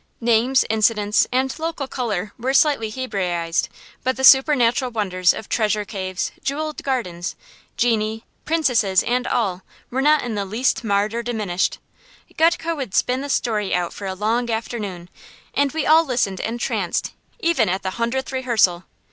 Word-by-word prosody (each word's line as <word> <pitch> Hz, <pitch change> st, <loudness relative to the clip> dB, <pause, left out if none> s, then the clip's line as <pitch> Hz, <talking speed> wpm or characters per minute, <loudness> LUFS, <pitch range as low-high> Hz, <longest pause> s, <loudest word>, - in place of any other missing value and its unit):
Names, 240 Hz, +2 st, +3 dB
incidents, 210 Hz, -1 st, +2 dB
and 260 Hz, +1 st, +1 dB
"local 320 Hz, -4 st, -3 dB
color" 215 Hz, -7 st, -3 dB
were 260 Hz, +3 st, -1 dB
slightly 275 Hz, -7 st, +3 dB
Hebraized, 180 Hz, -9 st, -2 dB, 0.3 s
but 260 Hz, 0 st, 0 dB
the 265 Hz, -, -4 dB
supernatural 260 Hz, -2 st, +5 dB
wonders 185 Hz, -6 st, +1 dB
of -, -, -7 dB
treasure 210 Hz, -2 st, 0 dB
caves, 185 Hz, -2 st, -4 dB
jewelled 305 Hz, +2 st, -3 dB
gardens, 185 Hz, -10 st, -3 dB, 0.4 s
genii, 225 Hz, -1 st, 0 dB, 0.2 s
princesses, 245 Hz, -, +2 dB
and 245 Hz, +1 st, 0 dB
all, 190 Hz, -6 st, 0 dB, 0.3 s
were 260 Hz, +2 st, 0 dB
not 300 Hz, +1 st, +4 dB
in 240 Hz, -2 st, -3 dB
the 205 Hz, -1 st, -1 dB
least 225 Hz, +7 st, 0 dB
marred 205 Hz, 0 st, +1 dB
or 235 Hz, -, -1 dB
diminished. 215 Hz, -7 st, -1 dB, 0.6 s
Gutke 330 Hz, 0 st, +2 dB
would 265 Hz, -9 st, -5 dB
spin 255 Hz, +1 st, +1 dB
the 285 Hz, -, -5 dB
story 210 Hz, -8 st, 0 dB
out 175 Hz, -1 st, -1 dB
for 200 Hz, -, -6 dB
a 190 Hz, -, -3 dB
long 230 Hz, +5 st, 0 dB
afternoon, 210 Hz, -6 st, -4 dB, 0.5 s
and 285 Hz, -1 st, +1 dB
we 320 Hz, -, -2 dB
all 320 Hz, +2 st, +6 dB
listened 235 Hz, -, -1 dB
entranced, 235 Hz, +2 st, -2 dB, 0.3 s
even 325 Hz, -, +2 dB
at 190 Hz, +2 st, -2 dB
the 190 Hz, -, -2 dB
hundredth 235 Hz, +6 st, -2 dB
rehearsal. 225 Hz, -9 st, +1 dB
230 Hz, 155 wpm, -21 LUFS, 200-265 Hz, 0.6 s, all